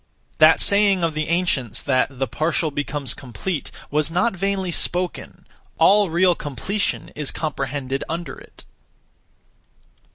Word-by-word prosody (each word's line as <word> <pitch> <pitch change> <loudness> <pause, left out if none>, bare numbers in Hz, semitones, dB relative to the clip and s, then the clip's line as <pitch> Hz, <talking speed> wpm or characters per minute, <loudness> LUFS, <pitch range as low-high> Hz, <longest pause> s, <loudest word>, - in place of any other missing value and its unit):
That 155 +1 +6
saying 200 -3 +5
of 165 -1 +1
the 155 0 -3
ancients 145 - 0
that 130 -2 +1
'the 135 - 0
partial 155 +2 -1
becomes 145 -3 -1
complete' 135 - -5 0.2
was 150 +2 +1
not 180 +6 0
vainly 190 -1 -1
spoken: 180 +1 -3 0.3
all 205 -1 +5
real 175 +2 +3
completion 170 - -3
is 150 -2 -3
comprehended 135 -3 -3
under 170 +1 -4
it. - - -17
160 Hz, 125 wpm, -21 LUFS, 140-185 Hz, 0.3 s, That